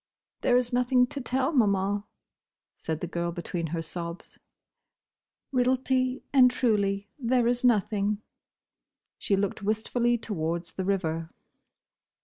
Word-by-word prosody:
"There 245 - +4
is 250 0 0
nothing 250 0 +4
to 275 +3 -6
tell, 260 +3 0
Maman," 200 - +2 0.7
said 160 -1 -4
the 175 - -2
girl 170 0 -2
between 170 0 -4
her 165 +1 -3
sobs. 170 +2 -6 1.1
"Realty 255 0 +1
and 255 -2 +7
truly 205 -5 0
there 245 -1 +2
is 245 +1 +1
nothing." 210 -2 +2 1.0
She 200 - +1
looked 200 +1 -1
wistfully 230 +3 +1
towards 170 -6 -3
the 190 - -4
river. 165 -4 -1
210 Hz, 120 wpm, -27 LUFS, 180-250 Hz, 1.1 s, and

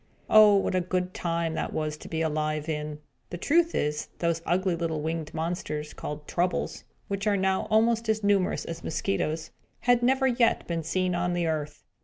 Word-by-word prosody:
Oh, 215 -1 +8
what 195 - +1
a 185 - +2
good 180 +1 -2
time 170 -1 -1 0.2
was 155 -1 -1
that 150 - -11
to - - -9
be 160 0 -1
alive 155 -1 -1
in! 150 -1 -3 0.3
The 175 - -5
truth 335 - +2
is, 150 0 -1
those 170 -1 0
ugly 185 +1 +1
little 165 -2 -2
winged 160 -1 -3
monsters, 160 -2 -3
called 150 0 -6
Troubles, 180 +1 -1 0.2
which 200 +1 -2
are 205 -1 +3
now 190 +1 +1
almost 225 +1 +3
as 215 -1 +1
numerous 200 -2 +2
as 165 0 -6
mosquitoes, 160 -2 -2 0.3
had 245 -1 +3
never 265 +2 +3
yet 240 -2 +2
been 170 -1 -2
seen 185 +3 0
on 175 0 0
the 175 -1 0
earth. 150 -2 -3
175 Hz, 185 wpm, -27 LUFS, 155-200 Hz, 0.3 s, Oh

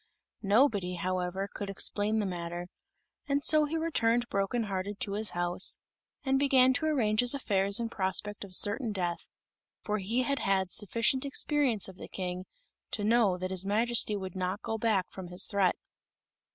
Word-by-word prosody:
Nobody, 200 -4 +2
however, 185 +2 -2
could 200 - -5
explain 205 +2 0
the 210 - 0
matter; 175 -1 -5 0.6
and 285 0 0
so 305 -1 +5
he 315 +2 -3
returned 240 -7 +1
broken 200 +4 -1
hearted 200 0 -4
to 200 - 0
his 210 +2 0
house, 175 +1 -1 0.5
and 270 -1 +1
began 260 -2 +5
to 315 +5 -1
arrange 220 -8 +1
his 245 +2 +4
affairs 200 -6 +1
in 235 - -2
prospect 205 0 -3
of 190 -2 +2
certain 220 +5 +4
death, 175 -3 -3 0.6
for 210 0 -2
he 225 +7 0
had 280 +3 -1
had 190 -2 0
sufficient 230 +5 0
experience 275 -5 +2
of 190 -1 -12
the - - -9
King 180 -1 -5 0.4
to 210 - -4
know 215 -4 +3
that 185 +1 -4
his 190 -1 0
Majesty 220 +2 +2
would 190 -2 -6
not 185 +2 -3
go 225 - -3
back 210 -5 +1
from 190 -2 -8
his 180 +2 +1
threat. 200 -3 +1
205 Hz, 170 wpm, -30 LUFS, 190-240 Hz, 0.6 s, so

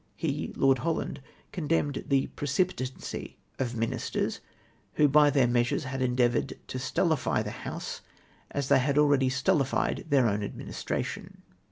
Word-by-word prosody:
He - - -2
(Lord 135 -1 +3
Holland) 165 -3 -2 0.3
condemned 150 -4 -1
the 135 -1 +3
precipitancy 145 -3 -2 0.2
of 125 -2 -1
ministers, 115 0 -1 0.6
who 150 - +5
by 145 +1 +6
their 135 -3 +4
measures 120 +3 +1
had 130 0 -4
endeavoured 125 -1 +1 0.2
to 130 - -3
stultify 160 +4 +1
the - - -5
House - - -6 0.5
as 140 -2 -2
they 135 - +5
had 140 +2 +1
already 145 -3 +4
stultified 135 +1 +1
their 140 -3 +4
oivn 105 -2 +1
administration. 100 - -5
135 Hz, 135 wpm, -28 LUFS, 130-145 Hz, 0.6 s, by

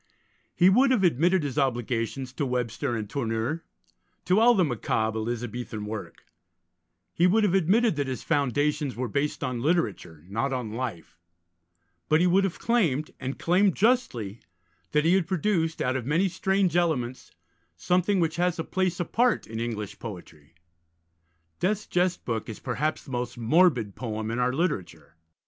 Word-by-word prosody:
He 180 - +5
would 250 +8 +5
have 250 -7 +2
admitted 175 +2 +3
his 145 0 -2
obligations 125 0 -1
to 145 - -2
Webster 120 -1 -2
and 110 -2 -4
Tourneur, 120 +5 -2 0.6
to 185 +3 +3
all 240 +1 +6
the 185 -4 +3
macabre 110 -4 -1
Elizabethan 120 -1 -4
work; 105 0 -7 0.9
he 175 - +3
would 215 +4 +3
have 200 -4 +2
admitted 195 +3 +3
that 140 -1 -1
his 130 -1 -4
foundations 145 -1 0
were 125 +1 -2
based 140 +7 -2
on 125 -3 -2
literature, 105 - -1
not 115 +8 -1
on 125 -4 -3
life; 115 -9 -5 0.9
but 155 - +4
he 175 - +3
would 190 +2 +4
have 185 - -3
claimed, 165 - +1
and 130 +1 -4
claimed 185 +2 +2
justly, 155 - +1 0.5
that 150 +1 +2
he 170 - +4
had 190 -4 +2
produced, 170 -3 0
out 130 +1 0
of 130 -2 -3
many 165 +7 +2
strange 190 -1 0
elements, 135 -8 0 0.5
something 185 +2 +1
which 165 -2 0
has 175 0 +1
a 165 - -2
place 185 0 -1
apart 230 +7 +1
in 110 +1 -6
English 110 -3 -4
poetry. 85 -8 -10 1.0
Death's 205 +3 0
Jest 180 0 0
Book 115 -2 -3
is 110 - -7
perhaps 150 +5 -2
the 135 - -12
most 125 -1 -3
morbid 120 - +3
poem 110 -2 -4
in 120 - -2
our 125 0 +2
literature. 140 - -3
145 Hz, 160 wpm, -26 LUFS, 120-180 Hz, 1.0 s, all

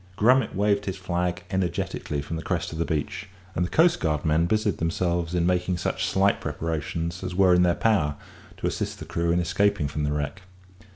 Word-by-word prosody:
Grummet 125 +1 +3
waved 100 +1 +2
his 95 - -2
flag 90 0 -2
energetically 90 -5 -2
from 80 - -5
the 80 - -3
crest 85 -1 -2
of 80 - -6
the 85 - +1
beach, 90 +5 -3 0.2
and 90 - 0
the 90 - -2
coastguardmen 80 - +2
busied 105 -2 0
themselves 85 +1 -1
in 85 -1 +2
making 90 0 +1
such - - -1
slight 95 +1 +2
preparations 80 +2 -3
as 90 -1 -4
were 95 -1 +5
in 90 - +5
their 90 -1 +3
power 90 -10 +2 0.4
to - - -5
assist - - -2
the - - -8
crew 85 0 -1
in 85 - +2
escaping 90 -1 +1
from 75 +1 -3
the 75 - 0
wreck. 75 +5 -3
90 Hz, 190 wpm, -25 LUFS, 80-95 Hz, 0.4 s, were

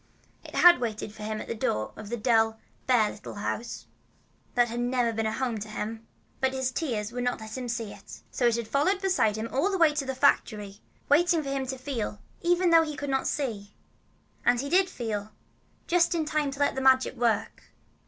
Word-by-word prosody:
It - - -11
had 350 -6 +7
waited 215 -2 -3
for 215 - -12
him 215 0 -3
at - - -7
the - - -2
door 110 - -2
of 215 -1 -9
the 240 - -2
dull, 225 -1 +2 0.3
bare 235 -5 +4
little 210 - -9
house 215 +3 -4 0.7
that 245 -1 +4
had 235 +1 -4
never 245 -1 +1
been 225 0 -1
home 235 0 -2
to 210 - -6
him, 220 +1 -5 0.3
but 265 0 +1
his 260 -1 -1
tears 235 -7 -2
would 245 0 -3
not 245 0 -1
let 220 0 -8
him 250 -2 -4
see 225 -3 -3
it. 200 0 -13
So 245 - +1
it 235 - +3
had 235 -2 -3
followed 285 - +2
along 390 - -9
beside 365 - +2
him 220 +1 -3
all 285 +9 +1
the 390 - 0
way 325 -4 +5
to 295 -2 -2
the 265 - -2
factory, 210 -7 +1 0.3
waiting 325 +2 +4
for 275 - -5
him 270 -1 -2
to 265 +1 -4
feel, 250 -6 -4 0.2
even 350 0 +3
if 325 -1 +7
he 300 -1 -5
could 285 -1 -3
not 265 0 0
see. 215 -8 -3 0.7
And 245 - +3
he 280 +2 -3
did 370 +3 +3
feel, 215 -3 -4 0.5
just 345 0 +2
in 320 -2 0
time 300 -1 0
to 275 0 -8
let 285 - +2
the 265 - -3
Magic 260 0 +4
work. 230 -4 -1
245 Hz, 220 wpm, -27 LUFS, 220-285 Hz, 0.7 s, had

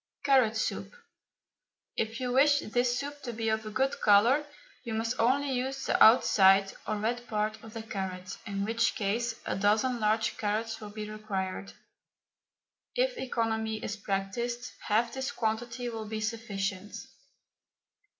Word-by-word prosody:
CARROT 260 -6 +4
SOUP. - - -2 1.1
If 225 +1 -2
you 250 -1 -2
wish 285 +3 +5
this 245 +2 0
soup 285 +2 -5
to 240 - -5
be 225 -1 -2
of 220 0 -1
a - - -3
good 265 +5 0
colour, 235 +9 +5 0.4
you 230 -3 -4
must 225 +2 -2
only 270 +4 +2
use 265 +1 -2
the - - +4
outside, 195 -4 +6
or 215 - 0
red 240 +3 -2
part, 215 0 -2
of 225 0 -11
the 225 - -5
carrot, 185 -3 -5
in 200 -1 -2
which 230 +1 +1
case 225 +3 -1
a - - -1
dozen 215 +5 +2
large 215 0 +1
carrots 225 +1 -1
will 210 - -7
be 210 0 -6
required. 195 -3 -4 1.2
If - - +1
economy 220 - -1
is 200 - -3
practised, 215 +5 -3 0.2
half 230 +2 +2
this 265 0 -3
quantity 235 +2 -2
will 225 -2 -4
be 215 +1 -4
sufficient. 205 -3 -3
225 Hz, 150 wpm, -30 LUFS, 210-245 Hz, 1.2 s, outside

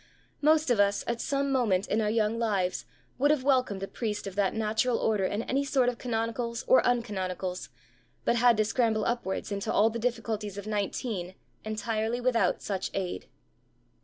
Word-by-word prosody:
Most 310 -2 +4
of 230 - +2
us, 200 0 +3
at 235 0 -2
some 280 0 0
moment 215 -8 +2
in 220 - +1
our 210 - +1
young 220 +1 +1
lives, 195 -6 0 0.3
would 285 +2 +4
have 300 -3 +2
welcomed 255 -8 +1
a - - -3
priest 210 -2 -4
of 195 - -5
that 200 +1 0
natural 220 +3 +1
order 210 -3 +1
in 205 +4 -1
any 275 +3 0
sort 265 -3 +2
of 245 - -6
canonicals 235 0 -2
or 260 - +6
uncanonicals, 190 -6 -2 0.6
but 235 - +2
had 240 -1 +5
to 215 - +3
scramble 220 -2 +1
upwards 235 -5 -2
into 200 0 -2
all 220 +2 +4
the 230 - -4
difficulties 220 -4 -2
of 200 - -6
nineteen 205 -3 -3 0.3
entirely 220 +2 -2
without 245 -2 +1
such 190 -2 -2
aid.' 180 - -3
220 Hz, 175 wpm, -28 LUFS, 205-245 Hz, 0.6 s, or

